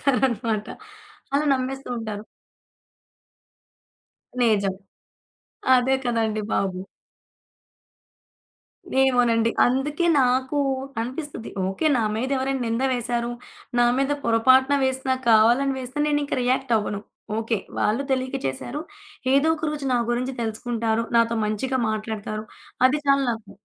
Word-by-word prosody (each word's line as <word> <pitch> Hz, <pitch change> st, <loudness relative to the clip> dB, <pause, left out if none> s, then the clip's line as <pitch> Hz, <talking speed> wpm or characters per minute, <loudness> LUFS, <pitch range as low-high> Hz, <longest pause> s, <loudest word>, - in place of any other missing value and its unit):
చేసేస్తారనమాట. 240 Hz, -5 st, +1 dB, 0.7 s
అలా 295 Hz, +2 st, +2 dB
నమ్మేస్తూ 265 Hz, +1 st, -4 dB
ఉంటారు. 215 Hz, -1 st, -5 dB, 2.2 s
నిజం. 200 Hz, -5 st, +2 dB, 1.0 s
అదే 255 Hz, +2 st, +2 dB
కదండీ 225 Hz, -3 st, 0 dB
బాబు! 185 Hz, -2 st, 0 dB, 2.2 s
ఏమోనండి. 240 Hz, -3 st, +3 dB, 0.2 s
అందుకే 295 Hz, +7 st, 0 dB, 0.2 s
నాకు 260 Hz, +3 st, +1 dB, 0.4 s
అనిపిస్తది. 260 Hz, 0 st, -5 dB, 0.2 s
ఓకే. 195 Hz, +12 st, -1 dB
నా 230 Hz, -, +1 dB
మీదేవరైనా 265 Hz, +1 st, -1 dB
నిందా 230 Hz, +4 st, 0 dB
వేసారు, 240 Hz, 0 st, -2 dB, 0.5 s
నా 240 Hz, -, +5 dB
మీద 275 Hz, +1 st, +1 dB
పొరపాటున 260 Hz, +4 st, +4 dB
వేసినా 260 Hz, 0 st, 0 dB
కావాలని 240 Hz, +5 st, +5 dB
వేసినా 260 Hz, +3 st, -3 dB
నేనింక 290 Hz, -1 st, 0 dB
రియాక్ట్ 255 Hz, 0 st, 0 dB
అవ్వను. 210 Hz, -1 st, -2 dB, 0.4 s
ఓకే. 225 Hz, -1 st, -1 dB, 0.2 s
వాళ్ళు 225 Hz, +6 st, +1 dB
తెలియక 260 Hz, +1 st, 0 dB
చేశారు. 240 Hz, -, -4 dB, 0.5 s
ఏదో 285 Hz, +3 st, +4 dB
ఒక 315 Hz, -, -5 dB
రోజు 295 Hz, -2 st, -5 dB
నా 245 Hz, -, +3 dB
గురించి 250 Hz, +2 st, -1 dB
తెలుసుకుంటారు. 230 Hz, 0 st, -1 dB
నాతో 230 Hz, 0 st, +3 dB
మంచిగా 260 Hz, +5 st, -1 dB
మాట్లాడతారు. 215 Hz, 0 st, -4 dB, 0.4 s
అది 290 Hz, +3 st, +1 dB
చాలు 275 Hz, 0 st, +4 dB
నాకు. 225 Hz, -2 st, -6 dB
245 Hz, 105 wpm, -24 LUFS, 225-265 Hz, 2.2 s, నా